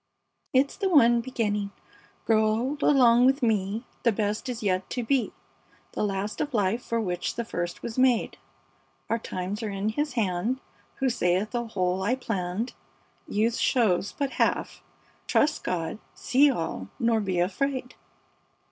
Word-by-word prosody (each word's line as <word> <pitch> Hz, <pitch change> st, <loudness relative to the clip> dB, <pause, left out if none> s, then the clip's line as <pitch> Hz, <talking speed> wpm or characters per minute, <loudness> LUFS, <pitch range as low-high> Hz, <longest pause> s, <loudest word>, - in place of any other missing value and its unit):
"It's 270 Hz, +1 st, +2 dB
the 390 Hz, -2 st, 0 dB
one 240 Hz, -8 st, +5 dB
beginning: 210 Hz, -5 st, -1 dB, 0.6 s
"Grow 220 Hz, -1 st, +4 dB
old 235 Hz, +7 st, 0 dB
along 250 Hz, -3 st, +5 dB
with 270 Hz, +1 st, +2 dB
me! 215 Hz, 0 st, 0 dB, 0.2 s
The 235 Hz, -, +3 dB
best 210 Hz, +3 st, -2 dB
is 240 Hz, -2 st, -4 dB
yet 185 Hz, -2 st, 0 dB
to 245 Hz, -, -2 dB
be, 255 Hz, +2 st, +1 dB, 0.6 s
The -, -, -4 dB
last 200 Hz, +1 st, -2 dB
of 290 Hz, -4 st, -2 dB
life, 210 Hz, +3 st, +1 dB
for 230 Hz, -, -1 dB
which 180 Hz, -5 st, -2 dB
the 235 Hz, -, -3 dB
first 175 Hz, -5 st, -4 dB
was 235 Hz, +2 st, -4 dB
made: 255 Hz, -3 st, +2 dB, 0.7 s
Our 230 Hz, -, +2 dB
times 190 Hz, +1 st, -4 dB
are 220 Hz, -, -3 dB
in 200 Hz, +1 st, -2 dB
His 290 Hz, +5 st, -2 dB
hand 220 Hz, +2 st, 0 dB, 0.4 s
Who 265 Hz, -, +1 dB
saith, 190 Hz, 0 st, 0 dB
'A 240 Hz, -1 st, -2 dB
whole 185 Hz, -3 st, -1 dB
I 220 Hz, +6 st, +1 dB
planned, 210 Hz, -2 st, -3 dB, 0.5 s
Youth 225 Hz, +3 st, +1 dB
shows 200 Hz, -6 st, +2 dB
but 280 Hz, -2 st, -1 dB
half; -, -, 0 dB, 0.5 s
trust 305 Hz, +1 st, +2 dB
God: 180 Hz, +3 st, -2 dB, 0.2 s
see 285 Hz, +3 st, +4 dB
all, 165 Hz, -, -3 dB
nor 230 Hz, -1 st, +2 dB
be 190 Hz, -4 st, -1 dB
afraid!'" 255 Hz, +8 st, -1 dB
225 Hz, 155 wpm, -27 LUFS, 195-255 Hz, 0.7 s, one